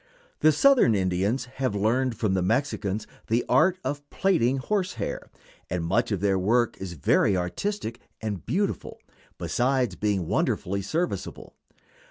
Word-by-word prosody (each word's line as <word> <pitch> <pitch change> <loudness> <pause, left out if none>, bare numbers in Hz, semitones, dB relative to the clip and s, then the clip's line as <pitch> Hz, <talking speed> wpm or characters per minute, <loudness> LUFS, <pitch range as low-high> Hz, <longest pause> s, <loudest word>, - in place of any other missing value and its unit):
The 155 - +5
Southern 240 - +5
Indians 95 +7 0
have 130 -3 -3
learned 115 +4 +1
from 105 -4 0
the 95 - +1
Mexicans 110 -1 -1 0.2
the 115 +2 +1
art 185 +3 +4
of 145 0 -4
plaiting 135 -10 +2
horse 190 +6 -1
hair, - - -5 0.4
and 85 -1 -2
much 85 +6 +1
of 100 -3 -1
their 100 -2 +2
work 115 +5 +2
is 95 -2 -5
very 95 +5 +2
artistic 115 - -3 0.2
and 105 -4 -4
beautiful, 200 +2 -2 0.4
besides 130 0 0
being 100 -4 0
wonderfully 100 +4 0
serviceable. 100 - -3
115 Hz, 140 wpm, -26 LUFS, 95-140 Hz, 0.4 s, The